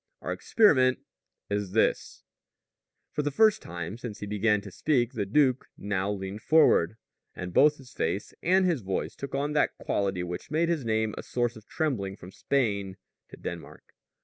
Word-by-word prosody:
Our - - -3
experiment 130 - +4 0.5
is 100 -2 -2
this 110 - 0 0.4
" - - -57
For - - 0
the 145 - 0
first 215 +8 +4
time 85 +5 -6
since 120 -4 -6
he 105 - -6
began 105 +1 +2
to 100 -1 -10
speak 125 - +1
the 100 -3 -2
duke 130 +2 +2
now 100 -1 -1
leaned 100 +1 -5
forward, 110 - +4 0.4
and 90 0 -6
both 150 +6 +5
his 130 -2 -15
face 90 +5 -2
and 185 +2 +3
his 170 -8 +1
voice 95 -1 -3
took 140 0 -6
on 145 +2 -1
that 150 - +1
quality 95 -3 -1
which 90 0 -6
made 160 +3 +1
his 165 -5 0
name 110 -1 0
a - - -3
source 120 -1 -1
of 110 -1 -14
trembling 110 -12 -2
from 90 -1 -12
Spain 100 -7 -1 0.3
to - - -12
Denmark. - - -8
110 Hz, 175 wpm, -28 LUFS, 100-145 Hz, 0.5 s, both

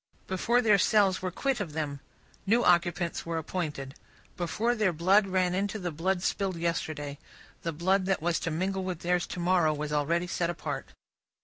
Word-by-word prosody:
Before 235 +6 +1
their 210 -3 +5
cells 200 -3 +3
were 185 - -1
quit 270 +8 -1
of 175 -7 -4
them, 145 -3 -3 0.5
new 235 +4 +4
occupants 175 0 +2
were 165 0 -3
appointed; 155 -5 -4 0.4
before 210 +7 0
their 215 -5 +2
blood 190 +5 +3
ran 185 -1 +1
into 200 +3 -1
the 180 -4 -3
blood 175 +4 -1
spilled 195 -2 0
yesterday, 155 -4 -3 0.4
the 165 - -2
blood 185 +4 +1
that 195 - +1
was 170 +1 0
to - - -2
mingle 190 +4 -1
with 185 -3 -4
theirs 175 0 +1
to - - -6
morrow 175 -3 +3
was 150 0 -4
already 165 +4 +1
set 170 -1 -1
apart. 150 -5 -5
175 Hz, 180 wpm, -29 LUFS, 160-190 Hz, 0.5 s, their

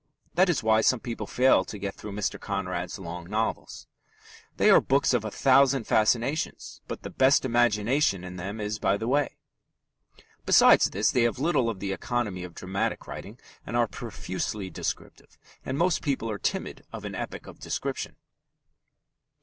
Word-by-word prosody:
That 180 +3 +4
is 160 -9 +1
why 110 0 +4
some 125 +2 +3
people 115 0 -5
fail 125 -6 +4
to 105 - -8
get 100 0 -4
through 105 -1 -9
Mr. 100 -4 -2
Conrad's 90 -2 -3
long 90 -1 -8
novels. 110 +2 -3 0.7
They - - +5
are - - +7
books 135 0 +2
of 120 -3 +1
a 110 - -3
thousand 135 +2 +4
fascinations, 120 +7 0
but - - -6
the - - -6
best 135 0 +4
imagination 120 -3 +2
in 90 0 -8
them 100 +5 -5
is 105 +1 -3
by 95 +1 +2
the 110 - -4
way. 145 +3 +1 1.1
Besides - - +6
this, 105 +3 +1
they 125 - +2
have 120 +1 +1
little 135 -4 +1
of 105 -4 -5
the 95 0 -2
economy 105 -4 -2
of 90 -1 -9
dramatic 95 +1 -3
writing, 105 +5 -9 0.2
but 120 - -6
are 120 -1 +3
profusely 100 0 -5
descriptive, - - -6 0.3
and 130 - -3
most 175 +2 +2
people 130 -6 -1
are 105 - -4
timid - - -3
of - - -7
an - - -5
epic - - -6
of - - -12
description. - - -4
110 Hz, 170 wpm, -27 LUFS, 100-130 Hz, 1.1 s, are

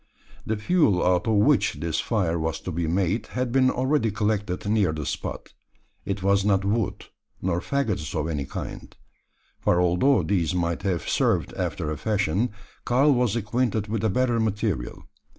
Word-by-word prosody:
The 110 - 0
fuel 110 - +2
out 90 +1 +2
of 110 - +2
which 105 - +3
this 80 +2 -2
fire 90 -7 0
was 80 0 -2
to 90 - -5
be 85 0 -2
made 95 +5 0
had 125 -1 -1
been 130 0 +4
already 130 -1 +1
collected 105 -3 -1
near 105 -5 +2
the 75 -2 -4
spot. - - -5 0.5
It 100 -1 -3
was 100 0 +3
not 100 -1 +2
wood, 100 -2 -1 0.3
nor 90 -1 -1
faggots 105 - -2
of 75 - -2
any 75 -4 -2
kind; - - -7 0.6
for 90 - +2
although 90 +6 +3
these 90 0 0
might 85 -1 -1
have 95 -4 -2
served - - +1
after 75 - -3
a 75 - -3
fashion, 100 +4 0 0.3
Karl 135 +4 +4
was 120 -4 +1
acquainted 110 -1 -1
with 110 -1 -2
a 110 - +3
better 120 +2 +1
material. 105 - -2
100 Hz, 170 wpm, -25 LUFS, 85-115 Hz, 0.6 s, been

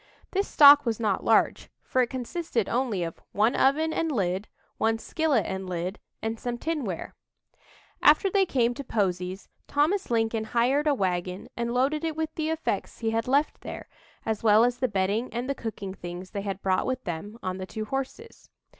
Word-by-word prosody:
This 395 +1 0
stock 290 0 +8
was 230 -4 -1
not 210 -4 0
large, - - +2
for 255 - +1
it 245 - +1
consisted 255 - -2
only 235 -7 0
of 165 -1 -6
"one 215 +4 +3
oven 315 +4 +3
and 325 0 0
lid, 195 -4 -1 0.3
one 225 0 +2
skillet 290 - 0
and 190 -1 -4
lid, 180 +2 -3 0.2
and 225 0 -2
some 240 -1 -3
tinware." 260 - -3 0.9
After 395 - +6
they 390 0 +2
came 245 -4 +2
to 280 - -6
Posey's, 185 -5 -2 0.2
Thomas 320 +7 +1
Lincoln 225 -1 +1
hired 255 +7 +2
a 290 - +4
wagon 180 -3 -2
and 235 0 -2
loaded 270 +5 +1
it 320 -2 -1
with 320 0 -2
the 310 0 -2
effects 320 0 -2
he 225 -1 -1
had 225 +1 -1
left 280 +4 +1
there, - - -7 0.4
as 220 -2 -1
well 215 0 +6
as 245 0 +1
the 255 - +2
bedding 200 +3 0
and 240 +2 -3
the 275 - 0
cooking 210 -6 -6
things 175 0 -8
they 200 - -3
had 195 -1 -5
brought 185 -1 +1
with 255 0 -2
them 195 +5 -5
on 185 0 -3
the 185 - -5
two 215 +2 -5
horses. 270 - -6
230 Hz, 190 wpm, -27 LUFS, 195-275 Hz, 0.9 s, stock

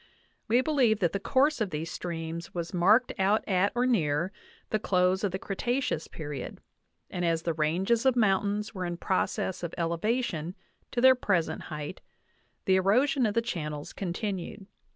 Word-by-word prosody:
We 240 +3 +4
believe 260 -7 +3
that 175 -5 +2
the 200 - -1
course 275 +5 +2
of 210 - +1
these 160 +1 -4
streams 165 -1 -5
was 170 0 -4
marked 205 +8 +4
out 200 +3 +2
at 190 0 +2
or 245 +1 +2
near 170 -7 +1 0.4
the 215 - +1
close 185 -1 +2
of 200 - +1
the 190 - -2
Cretaceous 240 - -2
period, 145 -4 -6 0.5
and 180 - -3
as 165 -1 +1
the 165 - 0
ranges 180 +9 +1
of 260 - +4
mountains 205 -1 +1
were 185 -3 -4
in 175 -1 -3
process 185 0 -1
of 170 -1 -5
elevation 170 0 -1 0.3
to 240 - -1
their 260 +1 +8
pres 190 -9 +1
ent - - -5
height 150 +2 -6 0.6
the 190 0 +4
erosion 245 +7 +3
of 210 - -3
the 230 - +2
channels 150 -9 -4
continued. 195 0 -4
190 Hz, 170 wpm, -28 LUFS, 170-225 Hz, 0.6 s, their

